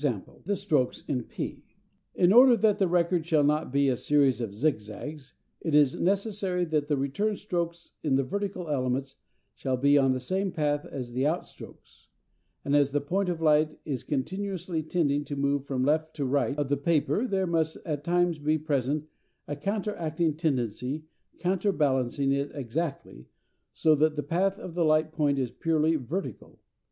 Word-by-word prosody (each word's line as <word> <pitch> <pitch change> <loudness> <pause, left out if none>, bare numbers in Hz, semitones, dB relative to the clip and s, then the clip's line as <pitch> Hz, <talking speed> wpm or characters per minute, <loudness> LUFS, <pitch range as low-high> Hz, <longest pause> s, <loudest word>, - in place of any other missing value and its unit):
_ 120 -10 -3
the 200 +2 0
stroke 155 -10 +1
in 130 -4 -1
p. - - -6 0.5
In 180 +1 +4
order 245 0 +8
that 210 0 +2
the 195 - +3
record 175 -1 +2
shall 155 -2 +2
not 150 -1 +1
be 140 +1 +3
a 130 - +2
series 140 -1 +2
of 115 -4 -3
zigzags 135 +4 -3 0.3
it 160 -3 0
is 145 -3 +5
necessary 195 -1 0
that 155 -3 0
the 145 -2 +1
return 145 +11 -1
strokes 170 -4 -4
in 145 -4 +1
the 135 - +2
vertical 195 +2 -3
elements 135 -1 -1 0.4
shall 130 -2 -2
be 140 +2 +4
on 135 -1 +3
the 130 - 0
same 190 +9 -1
path 145 -2 -1
as 125 -3 -6
the 130 +4 +1
out 165 +3 -1
strokes; - - -15 0.6
and 140 - +2
as 145 -1 +4
the 145 +1 0
point 180 +7 -1
of 170 -2 -3
light 155 0 +3
is 135 -5 -3
continuously 175 +3 -3
tending 150 -3 0
to 145 - -5
move 140 0 0
from 130 -2 -1
left 155 +2 +1
to 145 - -2
right 140 +2 0
of 145 -2 0
the 145 - +2
paper 170 - +1
there 195 -4 0
must 165 -2 0
at 150 -3 -3
times 175 -1 +1
be 155 +2 +1
present 145 -1 -1 0.4
a 145 - -3
counteracting 170 -3 -1
tendency 135 - -2 0.3
counterbalancing 145 - +1
it 140 +1 0
exactly, 140 - -4 0.4
so 155 - +3
that 155 +1 +2
the 150 - -2
path 190 +6 0
of 180 - -8
the 175 0 +1
light 155 0 +3
point 145 -3 +1
is 130 -3 -1
purely 160 +4 +1
vertical. 155 +7 -5
150 Hz, 175 wpm, -28 LUFS, 140-175 Hz, 0.6 s, order